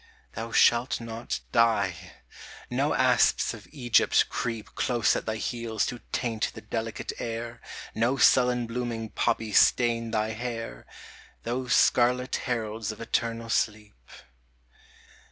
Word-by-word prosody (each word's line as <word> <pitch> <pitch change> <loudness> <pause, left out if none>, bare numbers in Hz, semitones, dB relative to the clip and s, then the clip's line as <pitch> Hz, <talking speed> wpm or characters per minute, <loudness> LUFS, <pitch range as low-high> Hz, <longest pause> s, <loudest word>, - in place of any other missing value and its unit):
Thou 115 +1 -5
shalt 120 +2 +3
not 115 0 -5
die: 110 -6 +1 0.6
no - - +1
asps - - +3
of - - -12
Egypt 120 -6 +3
creep 115 -3 -4
Close 120 -3 +1
at - - -4
thy 110 - -1
heels 115 -1 -2
to 125 -2 -5
taint 115 -3 -1
the - - -8
delicate 115 -1 -4
air; 115 0 -5 0.3
No 120 +5 +1
sullen 125 -1 +4
blooming 115 -1 -4
poppies 115 -2 +2
stain 115 -1 +2
thy 110 -1 0
hair, 115 - -6 0.6
Those 125 +2 0
scarlet 125 +1 +3
heralds 110 -3 -2
of 110 - -11
eternal 115 0 -2
sleep. 105 -2 -1
115 Hz, 120 wpm, -27 LUFS, 110-120 Hz, 0.6 s, sullen